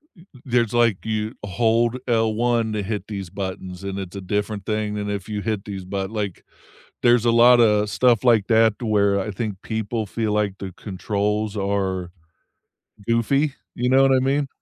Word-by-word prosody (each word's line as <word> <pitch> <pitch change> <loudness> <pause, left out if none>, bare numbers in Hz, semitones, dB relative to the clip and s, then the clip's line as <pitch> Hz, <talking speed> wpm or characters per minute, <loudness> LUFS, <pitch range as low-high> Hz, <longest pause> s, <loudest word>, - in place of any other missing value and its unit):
y 170 - -18
th 130 -9 -20
there's 120 -3 +1
like, 115 -5 +2
you 110 0 -2
hold 115 +4 +1
L1 115 0 +1
to 105 - -1
hit 100 -1 -4
these 100 -4 -6
buttons, 95 -1 -6
and 100 0 -4
it's 95 0 -7
a 100 - -5
different 105 +1 -3
thing 105 -1 -1
than 105 0 -3
if 100 -2 -4
you 105 -1 -3
hit 105 -2 -3
these 100 -2 -6
butt 95 0 -3
like, 105 -4 -4 0.6
there's 120 -1 +4
a 120 - +4
lotta 115 -3 +5
stuff 120 +1 +3
like 115 -5 +4
that 110 -2 +4
to 120 - -5
where 100 -2 +2
I 95 - -3
think 105 -1 -4
people 110 0 -3
feel 110 +1 -2
like 105 -2 0
the 95 -1 -6
controls 105 +1 -2
are 95 -3 -1 1.0
goofy, 130 +5 +1 0.2
you 125 +1 -1
know 135 +1 +5
what 135 0 +4
I 130 - +4
mean? 135 +2 0
105 Hz, 185 wpm, -22 LUFS, 100-115 Hz, 1.0 s, lotta